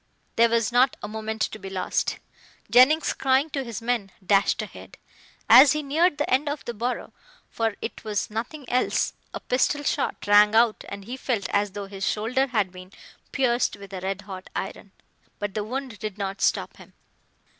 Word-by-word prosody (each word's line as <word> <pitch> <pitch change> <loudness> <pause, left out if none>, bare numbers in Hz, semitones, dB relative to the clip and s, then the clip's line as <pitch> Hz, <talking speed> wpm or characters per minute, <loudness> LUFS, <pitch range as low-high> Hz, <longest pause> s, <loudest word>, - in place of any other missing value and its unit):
There 235 0 +5
was 230 0 +1
not 250 +2 +3
a - - -3
moment 220 0 -3
to - - -3
be 195 - -7
lost. 185 -1 -1 0.5
Jennings, 290 +6 +5
crying 270 +3 +1
to 275 -1 -2
his 230 -2 -7
men, 230 -5 -1
dashed 195 +1 +3
ahead. - - -11 0.5
As 270 0 +9
he 305 0 -2
neared 305 +3 +2
the 295 - -1
end 275 +4 +1
of 290 0 -5
the 240 - -4
burrow, 240 +3 -3 0.4
for 225 -2 -1
it - - -6
was 210 -1 -2
nothing 245 +6 -5
else, 250 +1 +1 0.2
a - - -5
pistol 290 +3 0
shot - - -1
rang 210 +1 +6
out 230 -1 +3
and 200 -1 -8
he 250 +4 -6
felt 230 -7 -2
as 205 -1 0
though 205 0 -5
his 195 0 -8
shoulder 250 +6 0
had 210 -7 0
been 185 0 -12 0.4
pierced 250 -5 +1
with 200 -1 -12
a 185 - -5
red 195 +1 -3
hot 190 -2 -9
iron. 195 0 -5 0.5
But 205 -1 -4
the 210 -1 -2
wound 255 -1 -5
did 210 -1 -5
not 195 -1 -4
stop - - 0
him. - - -16
225 Hz, 190 wpm, -25 LUFS, 200-255 Hz, 0.5 s, As